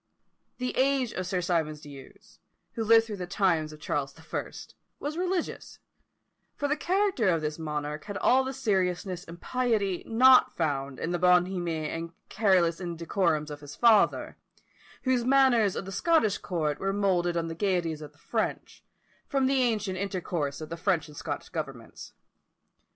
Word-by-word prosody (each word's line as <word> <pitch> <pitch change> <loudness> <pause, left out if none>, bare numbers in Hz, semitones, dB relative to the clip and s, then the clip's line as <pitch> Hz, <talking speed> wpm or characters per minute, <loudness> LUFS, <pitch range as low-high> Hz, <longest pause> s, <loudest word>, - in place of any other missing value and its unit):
The 250 0 -3
age 265 -2 +2
of 185 -1 -4
Sir 185 -1 -1
Symonds 165 -4 -1
D'Ewes, 140 -3 -14 0.3
who 225 - -2
lived 225 +1 +6
through 215 -3 -6
the 180 -1 -5
times 175 -5 +1
of 155 - -12
Charles 140 -2 -2
the 160 - -17
First, - - -6 0.3
was 295 +2 -4
religious; 360 0 -3 0.8
for 290 - -1
the 295 - +1
character 365 - +1
of 165 -3 +1
this 150 +1 -3
monarch 150 -1 -4
had 205 -1 -5
all 260 +1 +4
the 265 - -3
seriousness 190 -7 -1
and 170 +1 -11
piety 220 -7 0
not 255 +3 +6
found 140 -4 -2
in 170 - -2
the 175 - -1
bonhomie 175 -3 +2
and 165 +2 -5 0.2
careless 185 -5 +2
indecorums 170 -2 -1
of 145 0 -8
his 145 -1 -10
father, 230 -3 +3 0.7
whose 255 -2 +2
manners 250 -6 +4
of - - -4
the 195 - -7
Scottish 225 - +2
court 155 -5 -2
were 195 0 -1
moulded 180 -4 +1
on 165 0 -1
the 165 - -4
gaieties 170 -4 -1
of 150 -1 -9
the 145 - -28
French, 220 +7 -3 0.4
from 275 -1 +1
the 265 0 +2
ancient 210 -6 0
intercourse 175 -7 -3
of 155 - -7
the 165 - -5
French 170 -1 0
and 150 - -13
Scottish - - -5
governments. - - -7
185 Hz, 165 wpm, -28 LUFS, 165-230 Hz, 0.8 s, lived